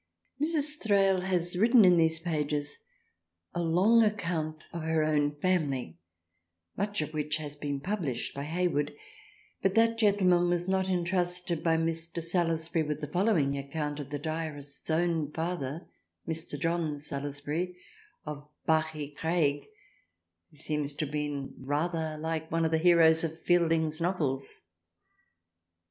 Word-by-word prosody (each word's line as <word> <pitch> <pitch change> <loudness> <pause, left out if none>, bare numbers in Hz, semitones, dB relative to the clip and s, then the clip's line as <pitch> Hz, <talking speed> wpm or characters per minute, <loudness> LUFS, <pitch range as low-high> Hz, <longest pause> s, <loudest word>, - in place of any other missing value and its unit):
Mrs. 300 -1 0
Thrale 195 -3 +3
has 180 -2 0
written 225 +3 +6
in 180 -1 +7
these 160 -1 +3
pages 150 -3 -2 0.7
a 175 - -1
long 185 +8 +4
account 170 -7 -1
of 170 - -4
her 160 0 +1
own 150 -1 +1
family, 145 - -1 0.8
much 205 -4 -1
of 155 - -7
which 150 -1 -1
has 145 -2 -6
been 145 -1 -3
published 150 - -3
by 140 +1 -5
Hayward, 160 -3 0 0.7
but 195 +1 +1
that 230 0 +3
gentleman 185 -5 +4
was 175 0 0
not 190 0 +1
entrusted 180 -1 -1
by 165 -1 +2
Mr. 165 +1 -2
Salusbury 165 -1 0
with 150 -1 -3
the 150 - -3
following 160 -5 +2
account 150 +1 -4
of 140 -2 -6
the 145 - -3
diarists 155 -2 -5
own 160 -2 +1
father 165 -1 -3 0.4
Mr. 160 -2 -2
John 165 -2 -1
Salusbury 145 +5 -4 0.5
of 145 -1 -7 0.2
Bachygraig, 155 -1 0 0.8
who 155 - -21
seems 150 -1 -2
to 155 - -1
have 145 - -8
been 145 -2 -3
rather 155 +3 -1
like 160 0 -3
one 165 0 +1
of 160 - 0
the 160 - +3
heroes 165 -1 +6
of 160 0 -3
Fielding's 165 -2 +2
Novels. 150 -7 -2
160 Hz, 135 wpm, -29 LUFS, 150-175 Hz, 0.8 s, in